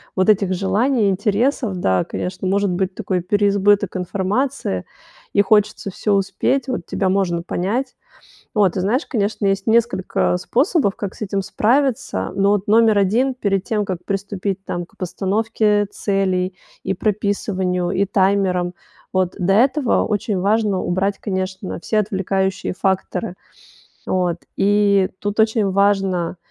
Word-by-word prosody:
вот 185 Hz, -1 st, +2 dB
этих 200 Hz, -3 st, +3 dB
желаний, 205 Hz, +5 st, +1 dB
интересов, 205 Hz, +2 st, 0 dB
да, 95 Hz, -, +1 dB
конечно, 180 Hz, +1 st, -4 dB
может 200 Hz, 0 st, +1 dB
быть 185 Hz, +1 st, -1 dB
такой 185 Hz, -2 st, -2 dB
переизбыток 205 Hz, +1 st, +2 dB
информации, 190 Hz, -, -2 dB, 0.5 s
и 200 Hz, -, +5 dB
хочется 210 Hz, 0 st, +1 dB
всё 205 Hz, +3 st, -1 dB
успеть. 220 Hz, +7 st, 0 dB
Вот 245 Hz, -10 st, -3 dB
тебя 190 Hz, -, 0 dB
можно 180 Hz, -3 st, 0 dB
понять. 225 Hz, +10 st, -2 dB, 0.6 s
Вот, 200 Hz, -4 st, +3 dB
ты 185 Hz, -, -2 dB
знаешь, 235 Hz, -, 0 dB
конечно, 210 Hz, -3 st, -1 dB
есть 195 Hz, +2 st, 0 dB
несколько, 220 Hz, -, +1 dB
э, -, -, 0 dB
способов, 265 Hz, -, +1 dB
как 200 Hz, -2 st, -5 dB
с -, -, -10 dB
этим 195 Hz, -1 st, -1 dB
справиться, 230 Hz, -, 0 dB
но 195 Hz, +1 st, +2 dB
вот 205 Hz, 0 st, +1 dB
номер 220 Hz, -1 st, +4 dB
1, 235 Hz, +7 st, +2 dB
перед 200 Hz, -6 st, 0 dB
тем, 210 Hz, 0 st, -1 dB
как 185 Hz, -3 st, -3 dB
приступить, 195 Hz, -1 st, -3 dB
там, 175 Hz, -1 st, -4 dB
к -, -, -25 dB
постановке 205 Hz, +3 st, 0 dB
целей, 185 Hz, -2 st, -1 dB, 0.3 s
и -, -, -1 dB
прописыванию, 190 Hz, -4 st, -1 dB
и 195 Hz, +2 st, +2 dB
таймерам, 190 Hz, -2 st, +1 dB, 0.4 s
вот, 185 Hz, -1 st, 0 dB
до 190 Hz, 0 st, +1 dB
этого 260 Hz, +3 st, +3 dB
очень 205 Hz, -1 st, -1 dB
важно 205 Hz, -1 st, +1 dB
убрать, 195 Hz, +3 st, -1 dB
конечно, 190 Hz, -1 st, -4 dB
все 215 Hz, -, -1 dB
отвлекающие 190 Hz, -2 st, -1 dB
факторы. 190 Hz, +1 st, -1 dB, 0.7 s
Вот, 180 Hz, -2 st, 0 dB, 0.2 s
и 200 Hz, -1 st, +3 dB
тут 205 Hz, +1 st, -3 dB
очень 220 Hz, -2 st, +2 dB
важно, 195 Hz, -3 st, +1 dB
195 Hz, 140 wpm, -20 LUFS, 185-210 Hz, 0.7 s, и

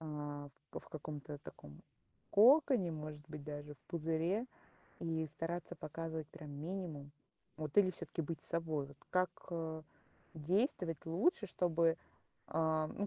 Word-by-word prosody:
а, 145 Hz, -2 st, -4 dB, 0.2 s
в -, -, -4 dB
в -, -, -15 dB
каком-то 150 Hz, -1 st, -5 dB
таком 75 Hz, -, -11 dB, 0.5 s
коконе, 245 Hz, -, +7 dB
может 150 Hz, -1 st, -5 dB
быть, 150 Hz, -2 st, -6 dB
даже 145 Hz, 0 st, -5 dB
в -, -, -23 dB
пузыре, 170 Hz, +7 st, +1 dB, 0.5 s
и 160 Hz, -1 st, 0 dB
стараться 165 Hz, +3 st, -3 dB
показывать 160 Hz, 0 st, -4 dB
прям 150 Hz, -2 st, -9 dB
минимум. 155 Hz, -1 st, -4 dB, 0.5 s
Вот 155 Hz, -2 st, -4 dB
или 185 Hz, -2 st, +7 dB
всё-таки 175 Hz, -, -4 dB
быть 160 Hz, +1 st, -3 dB
собой? 160 Hz, -4 st, 0 dB
Вот 140 Hz, 0 st, -14 dB
как, 185 Hz, -1 st, +4 dB, 0.2 s
а, 160 Hz, -2 st, -2 dB, 0.5 s
действовать 170 Hz, -, +1 dB
лучше, 205 Hz, -, +3 dB
чтобы, 170 Hz, -2 st, +3 dB, 0.5 s
а, 160 Hz, -1 st, +2 dB
ну, 205 Hz, -, 0 dB
160 Hz, 135 wpm, -38 LUFS, 150-175 Hz, 0.5 s, коконе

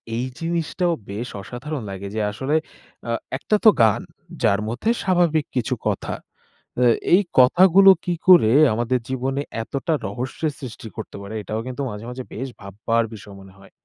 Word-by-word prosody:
এই 120 Hz, +2 st, -1 dB
জিনিসটাও 170 Hz, +1 st, -1 dB, 0.2 s
বেশ 110 Hz, +5 st, -4 dB
অসাধারণ 130 Hz, +7 st, -6 dB
লাগে 95 Hz, 0 st, -6 dB
যে 110 Hz, -, -1 dB
আসলে 135 Hz, +8 st, -2 dB, 0.5 s
আ -, -, 0 dB, 0.3 s
একটা 215 Hz, -, 0 dB
তো 220 Hz, -, +9 dB
গান 110 Hz, -2 st, +3 dB, 0.4 s
যার 100 Hz, +1 st, +3 dB
মধ্যে 120 Hz, -, -2 dB
স্বাভাবিক 175 Hz, -5 st, +2 dB
কিছু 125 Hz, -4 st, 0 dB
কথা -, -, -2 dB, 0.7 s
আ -, -, +5 dB, 0.3 s
এই 190 Hz, -, +7 dB, 0.2 s
কথাগুলো 185 Hz, +9 st, +7 dB, 0.2 s
কী 175 Hz, -, 0 dB
করে 175 Hz, -12 st, +7 dB, 0.2 s
আমাদের 120 Hz, +2 st, 0 dB
জীবনে 130 Hz, +2 st, -2 dB, 0.2 s
এতটা 140 Hz, +8 st, -2 dB
রহস্যের 130 Hz, +5 st, -3 dB
সৃষ্টি 115 Hz, -3 st, -8 dB
করতে 110 Hz, -, -7 dB
পারে? 100 Hz, +2 st, -8 dB
এটাও 110 Hz, +2 st, -4 dB
কিন্তু 130 Hz, +2 st, -5 dB
মাঝে, 105 Hz, 0 st, -7 dB
মাঝে 125 Hz, +1 st, -6 dB
বেশ 130 Hz, +5 st, -4 dB
ভাববার 110 Hz, +4 st, -1 dB
বিষয় 100 Hz, -2 st, -11 dB
মনে 95 Hz, -1 st, -15 dB
হয়। 100 Hz, -, -17 dB
125 Hz, 160 wpm, -22 LUFS, 110-160 Hz, 0.7 s, তো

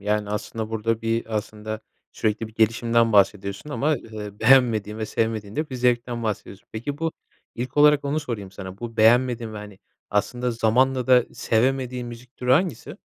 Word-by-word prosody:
Yani, 105 Hz, 0 st, -1 dB
aslında 110 Hz, +1 st, -4 dB
burada 115 Hz, +1 st, -1 dB
bir, 115 Hz, 0 st, -1 dB
aslında 110 Hz, 0 st, -5 dB, 0.3 s
sürekli 110 Hz, +1 st, -1 dB
bir 110 Hz, -, -18 dB
gelişimden 115 Hz, +1 st, +2 dB
bahsediyorsun 100 Hz, +5 st, +2 dB
ama, 150 Hz, +1 st, +1 dB
eee, 105 Hz, -3 st, -9 dB
beğenmediğin 115 Hz, -5 st, +4 dB
ve 110 Hz, -, -2 dB
sevmediğin 110 Hz, -2 st, -2 dB
de 155 Hz, 0 st, -2 dB
bir -, -, -5 dB
zevkten 120 Hz, -1 st, 0 dB
bahsediyorsun. 105 Hz, -2 st, -5 dB
Peki, 140 Hz, +6 st, -4 dB
bu 165 Hz, 0 st, -1 dB, 0.4 s
ilk 125 Hz, +3 st, -5 dB
olarak 150 Hz, 0 st, +5 dB
onu 145 Hz, +2 st, 0 dB
sorayım 115 Hz, -9 st, -5 dB
sana. 95 Hz, 0 st, -9 dB
Bu 115 Hz, -1 st, -7 dB
beğenmediğin 120 Hz, 0 st, +3 dB
ve, -, -, -7 dB
hani, 105 Hz, -2 st, -9 dB, 0.3 s
aslında 120 Hz, +4 st, 0 dB
zamanla 125 Hz, +3 st, +2 dB
da 125 Hz, -2 st, +6 dB
sevemediğin 125 Hz, +1 st, 0 dB
müzik 120 Hz, +2 st, -11 dB
türü 125 Hz, 0 st, +1 dB
hangisi? 170 Hz, +3 st, 0 dB
115 Hz, 165 wpm, -24 LUFS, 105-125 Hz, 0.4 s, da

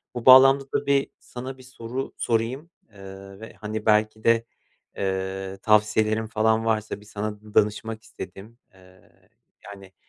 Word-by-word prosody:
Bu 120 Hz, -, -5 dB
bağlamda 135 Hz, +1 st, +8 dB
da -, -, 0 dB
bir 140 Hz, -1 st, +2 dB
sana 130 Hz, +2 st, -8 dB
bir -, -, -13 dB
soru 125 Hz, +1 st, -6 dB
sorayım, 120 Hz, +8 st, -1 dB, 0.2 s
eee, 95 Hz, 0 st, -12 dB
ve 110 Hz, -, -10 dB
hani 110 Hz, 0 st, -6 dB
belki 110 Hz, 0 st, +2 dB
de, 115 Hz, 0 st, +3 dB, 0.5 s
eee, 95 Hz, 0 st, -3 dB
tavsiyelerin 110 Hz, +1 st, +2 dB
falan 110 Hz, 0 st, +1 dB
varsa 110 Hz, -2 st, -1 dB
bir -, -, -17 dB
sana 105 Hz, 0 st, -5 dB
d 105 Hz, 0 st, -15 dB
danışmak 110 Hz, +1 st, 0 dB
istedim. 100 Hz, +5 st, -10 dB, 0.2 s
Eee, 95 Hz, -1 st, -21 dB, 0.5 s
yani 95 Hz, -2 st, -12 dB
110 Hz, 145 wpm, -24 LUFS, 100-115 Hz, 0.5 s, bağlamda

